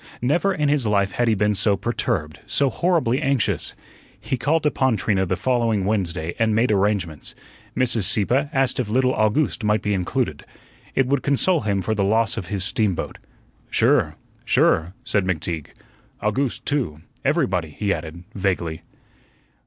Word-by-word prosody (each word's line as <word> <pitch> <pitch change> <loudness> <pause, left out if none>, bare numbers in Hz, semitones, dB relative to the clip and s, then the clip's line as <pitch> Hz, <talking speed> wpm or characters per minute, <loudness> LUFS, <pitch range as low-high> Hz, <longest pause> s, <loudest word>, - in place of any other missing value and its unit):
Never 160 +10 +1
in 150 -5 0
his 140 -5 +2
life 100 -2 +2
had 120 +3 0
he 110 - +3
been 105 +1 +2
so 100 0 +2
perturbed, 75 -10 -2
so 140 -2 +2
horribly 160 -6 +1
anxious. 135 -4 0 0.4
He - - -2
called 150 +5 0
upon 130 -5 +2
Trina 95 -2 0
the 95 - 0
following 115 -2 +1
Wednesday 85 -5 -1
and 110 -2 +2
made 115 +1 +2
arrangements. 95 -6 -1 0.4
Mrs. 120 -5 +2
Sieppe 120 +8 +2
asked 135 -1 +1
if 120 -5 -1
little 130 +3 +2
August 110 +4 +1
might 105 -1 +1
be 105 - 0
included. 90 -2 -2 0.5
It 135 - +3
would 135 +1 +1
console 155 +5 +2
him 100 -3 -1
for 110 - 0
the 105 -2 0
loss 110 +2 +2
of 90 - -5
his 100 -3 -2
steamboat. 105 -2 0 0.5
"Sure, - - +2 0.3
sure," 85 +4 +2
said 105 -5 0
McTeague. 85 -3 -2 0.5
"August 125 +4 -1
too 120 - -1 0.2
everybody," 95 - +1
he 100 +7 -1
added, 80 +1 -7
vaguely. 90 -5 -2
110 Hz, 155 wpm, -22 LUFS, 95-130 Hz, 0.5 s, he